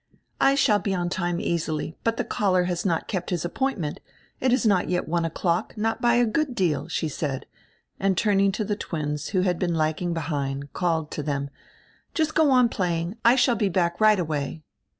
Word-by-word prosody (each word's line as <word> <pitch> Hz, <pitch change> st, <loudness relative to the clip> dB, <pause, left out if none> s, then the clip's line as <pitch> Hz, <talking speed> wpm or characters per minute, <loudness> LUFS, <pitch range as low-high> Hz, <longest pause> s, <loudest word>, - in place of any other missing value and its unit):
"I 275 Hz, -, +4 dB
shall 220 Hz, -7 st, +3 dB
be 195 Hz, -2 st, -1 dB
on 175 Hz, -1 st, -1 dB
time, 175 Hz, -1 st, -1 dB
easily, 160 Hz, -2 st, -2 dB
but 230 Hz, 0 st, 0 dB
die -, -, 0 dB
caller 185 Hz, -3 st, +1 dB
has 175 Hz, -1 st, -2 dB
not 165 Hz, -3 st, -1 dB
kept 185 Hz, -4 st, -3 dB
his 175 Hz, -2 st, -1 dB
appointment. 175 Hz, -, -2 dB, 0.4 s
It 255 Hz, -, +2 dB
is 255 Hz, 0 st, +2 dB
not 195 Hz, -4 st, +3 dB
yet 180 Hz, 0 st, -1 dB
one 170 Hz, +1 st, 0 dB
o'clock, 170 Hz, +4 st, -1 dB
not 225 Hz, +1 st, -1 dB
by 240 Hz, 0 st, +4 dB
a 240 Hz, 0 st, +4 dB
good 265 Hz, +3 st, -1 dB
deal," 155 Hz, -, 0 dB
she 160 Hz, -1 st, -2 dB
said, 140 Hz, -3 st, -3 dB, 0.5 s
and 195 Hz, -2 st, +1 dB
turning 200 Hz, -1 st, +3 dB
to 215 Hz, +1 st, -2 dB
die 205 Hz, 0 st, -2 dB
twins, 150 Hz, -2 st, -3 dB
who 185 Hz, -2 st, +1 dB
had 180 Hz, -2 st, 0 dB
been 175 Hz, -2 st, 0 dB
lagging 160 Hz, +2 st, 0 dB
behind, 140 Hz, -3 st, -3 dB
called 165 Hz, -3 st, -1 dB
to -, -, -3 dB
them: 140 Hz, -1 st, -3 dB, 0.6 s
"Just 315 Hz, -1 st, +1 dB
go 315 Hz, -2 st, +4 dB
on 250 Hz, -2 st, +5 dB
playing; 175 Hz, -2 st, -2 dB
I 235 Hz, +2 st, +6 dB
shall 250 Hz, -1 st, +4 dB
be 210 Hz, -3 st, +1 dB
back 170 Hz, 0 st, 0 dB
right 215 Hz, -1 st, +6 dB
away." 155 Hz, -2 st, -3 dB
180 Hz, 200 wpm, -25 LUFS, 160-215 Hz, 0.6 s, I